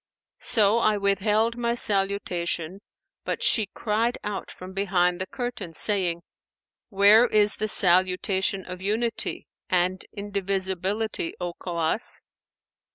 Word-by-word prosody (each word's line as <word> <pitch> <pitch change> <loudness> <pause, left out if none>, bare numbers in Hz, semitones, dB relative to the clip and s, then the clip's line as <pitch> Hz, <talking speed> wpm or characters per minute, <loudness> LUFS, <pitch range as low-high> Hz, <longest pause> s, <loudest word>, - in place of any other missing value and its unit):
So 215 0 +3
I 215 -2 +2
withheld 210 +3 +1
my 235 -1 -1
salutation, 195 -4 0 0.4
but - - -3
she 220 -4 +2
cried 225 +4 -1
out 205 -2 -5
from 185 +1 -10
behind 180 -2 0
the 185 - -3
curtain, 225 -10 -6
saying, 180 -5 +2 0.7
'Where 210 +3 +6
is 210 -2 +2
the 215 - -2
salutation 185 0 +2
of 180 0 -8
Unity 225 +4 -1 0.2
and 185 +1 0
Indivisibility, 195 -1 -3
O 175 -1 -4
Khawwas?' 170 +4 -1
195 Hz, 110 wpm, -25 LUFS, 185-215 Hz, 0.7 s, Where